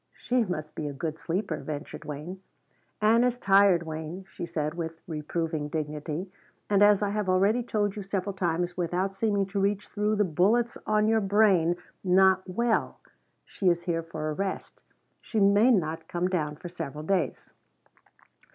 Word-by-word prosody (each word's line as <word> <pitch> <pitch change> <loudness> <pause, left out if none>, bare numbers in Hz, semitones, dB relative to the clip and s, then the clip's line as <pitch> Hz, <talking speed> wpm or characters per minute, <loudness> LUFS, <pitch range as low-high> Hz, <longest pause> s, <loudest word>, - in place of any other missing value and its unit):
"She 250 -1 +1
must 155 -5 -5
be 150 - -4
a 145 - -4
good 155 +3 -4
sleeper," 175 -1 -2
ventured 145 +1 -7
Wayne. 155 +6 -7 0.6
"Ann 230 +3 +5
is 250 -1 +1
tired, 195 -5 +4
Wayne," 160 +3 -6
she 170 - -6
said 155 -2 -2
with 165 -1 -5
reproving 160 -1 -3
dignity, 155 +3 -4 0.4
"and 200 -1 +4
as 205 0 +6
I 200 - 0
have 210 -2 -1
already 200 +6 +3
told 210 -4 -1
you 210 - -5
several 195 0 -3
times 175 -1 -1
without 180 +2 -1
seeming 200 0 +1
to 195 +1 -3
reach 200 +1 0
through 210 +1 0
the 210 - +3
bullets 205 +8 +2
on 215 0 +3
your 220 0 +3
brain, 195 -4 +3 0.3
not 190 0 +5
well. 230 +4 0 0.5
She 190 - 0
is 170 0 +1
here 170 -2 -1
for 155 -2 -4
a - - -2
rest. 195 +4 -4 0.4
She 220 - -2
may 205 +4 +5
not 165 -7 +1
come 175 +1 -1
down 155 -5 -1
for 170 - -9
several 150 -3 -6
days." 185 +1 -1
185 Hz, 170 wpm, -27 LUFS, 160-205 Hz, 0.6 s, as